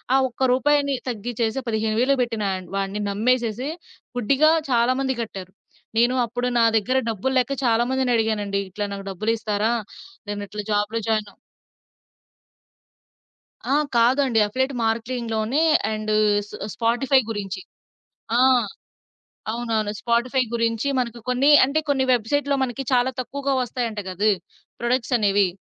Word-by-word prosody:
ఆ - - +6
ఒక్క 255 +1 0
రూపాయిని 280 +1 +2
తగ్గిచ్చేసి 230 +2 -2
15,000 220 +4 +1
బెట్టిన 225 -4 -1
ఆయన్ 185 -1 -5
వాడిని 195 +1 -2
నమ్మేసేసి, 240 +4 0 0.5
గుడ్డిగా 275 +7 +4 0.2
చాలామంది 255 +3 +2
గట్టారు. 190 -5 -7 0.5
నేను 245 +2 +3
అప్పుడు 245 +2 -3
నా 230 - +5
దగ్గర 255 +5 0
డబ్బులు 225 +5 -2
లేక 250 +2 -1
చాలా 230 0 +3
మందినడిగానండి. 220 -6 0
ఇట్లా 205 +3 -3
నాకు 195 0 -7
డబ్బులిస్తారా? 215 +2 0 0.5
నేను 205 0 -4
ఇట్లా 210 +1 -6
జాబ్‌లో 210 +2 0
జాయినవ్ 215 -2 -1 2.4
ఆ! - - +4 0.2
కాదండి. 245 0 +3
అఫ్లియేట్ 260 +5 -1
మార్కెలింగ్‌లోనే. 230 +3 -1 0.3
అండ్ 215 0 -3 0.4
స్ - - -15 0.2
స్పాటిఫై 245 +3 +2
గురించి. 195 -3 -4 0.8
ఆ! - - +5 1.1
అవునవును. 225 -3 -1
స్పాటిఫై 240 +3 +1
గురించి 230 +2 0
మనకు 235 -1 -3
కొన్ని 255 +4 +3 0.2
అంటే 280 +4 0
కొన్ని 270 -2 +2
వెబ్‌సైట్‌లో 280 +5 0
మనకి 260 +1 -3
చాలా 255 +1 +3
తక్కువగా 275 +2 -2
వస్తాయంట 235 -3 -3
గదా! 200 +4 +1 0.5
ప్రొడక్ట్సనేవి. 230 -5 +2
235 Hz, 115 wpm, -23 LUFS, 215-255 Hz, 2.4 s, ఆ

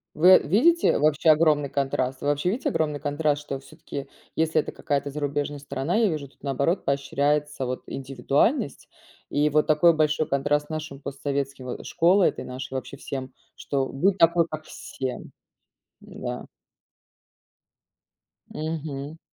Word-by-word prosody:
Вы 180 +4 +8
видите 330 - +3
вообще 155 +2 +3
огромный 150 -2 +4
контраст? 135 -2 -1
Вы 145 - -2
вообще 145 +4 +1
видите 260 +8 -1
огромный 150 - 0
контраст, 145 0 0
что 140 -2 -4
всё-таки, 140 -1 -8 0.3
если 160 0 +2
это - - -6
какая-то 140 0 -2
зарубежная 145 0 -2
страна, 140 +4 -2
я 225 -1 +4
вижу, 150 -5 -3
тут 135 - -30
наоборот 140 +6 0
поощряется 140 +1 0
вот 125 +1 -4
индивидуальность. 135 - 0 0.4
И 150 +1 +2
вот 150 +1 +3
такой 160 +2 +5
большой 155 0 +1
контраст 145 +2 +1
с - - -28
нашим 155 -3 -5
постсоветским, 135 -2 -4
э, 125 - -6
школой 180 +3 +4
этой - - -8
нашей, 130 +1 -7
вообще, 130 +1 -5
всем, 130 -1 -6 0.2
что 135 -2 -2
будь 185 +10 +1
такой 170 0 +5
как 155 -1 -6
все. 130 -4 -5 0.8
М-да. - - -6 2.1
Мгм. 155 -2 -4
145 Hz, 140 wpm, -25 LUFS, 140-160 Hz, 2.1 s, Вы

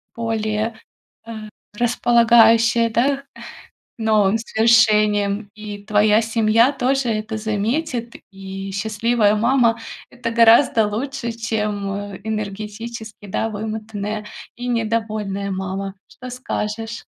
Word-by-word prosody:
более, 220 -1 -2 0.5
э, 230 - -7 0.4
располагающее, 230 -1 +4
да, 275 +5 +1 0.7
новым 215 -2 +2
свершениям. 215 -3 +3
И 210 -1 -8
твоя 210 +1 +3
семья 225 +3 +3
тоже 270 -1 0
это 215 0 -3
заметит. 230 +4 -2 0.2
И 195 0 -7
счастливая 215 +1 +1
мама- 235 0 +3 0.3
это 240 -1 -4
гораздо 230 -1 +5
лучше, 255 +3 -4
чем 205 -3 -3
энергетически, 215 +1 -6
да, 220 +3 -1
вымотанная 215 0 -5 0.3
и 245 +1 -6
недовольная 215 -4 -2
мама. 190 +1 -4
Что 255 0 -10
скажешь? 225 -2 -4
220 Hz, 95 wpm, -20 LUFS, 210-230 Hz, 0.7 s, гораздо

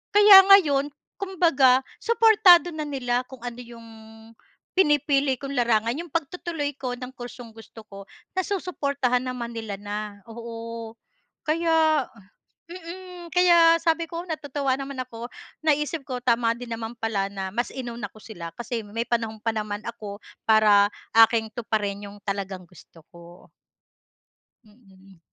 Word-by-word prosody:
Kaya 410 -2 +10
ngayon, 290 -8 +5 0.3
kumbaga, 320 -10 +3 0.2
suportado 405 -7 +5
na 310 - -3
nila 250 -3 -1
kung 265 -2 -12
ano 245 0 -6
'yong 235 -1 -12 0.9
pinipili 290 -5 +2
kong 280 0 -6
larangan. 230 -1 +2
'Yong 340 +3 -6
pagtutuloy 325 -2 -3
ko 250 -2 -3
ng 250 +1 -8
kursong 240 -1 -9
gusto 225 0 -13
ko, 195 0 -11 0.3
nasusuportahan 280 -10 -1
naman 240 -2 -5
nila 220 -3 -5
na. 205 +1 -5 0.3
Oo. 230 0 -8 0.5
Kaya 315 -2 +2 0.7
mm. 365 +1 -9 0.3
Kaya 340 -2 +6
sabi 330 0 +1
ko, 335 +2 -6
natutuwa 285 -4 -2
naman 275 -1 -7
ako. 235 -1 -9 0.4
Naisip 300 0 0
ko, 255 - -4
tama 230 -1 +2
din 245 0 -9
naman 230 +1 -6
pala 215 -3 -2
na 195 -1 -5
mas 240 +3 -1
inuna 235 -4 -6
ko - - -24
sila, 170 -7 -9
kasi 240 0 -4
may 225 +3 -4
panahon 225 -2 -1
pa 225 0 -1
naman 210 -1 -4
ako 210 -3 -7 0.3
para 210 -2 +5 0.3
aking 225 0 +5
tuparin 205 -3 -3
'yong 205 +1 -13
talagang 195 -2 -4
gusto 165 -3 -18
ko. 170 0 -15 1.2
Mm. 195 -4 -21
245 Hz, 135 wpm, -24 LUFS, 220-305 Hz, 1.2 s, Kaya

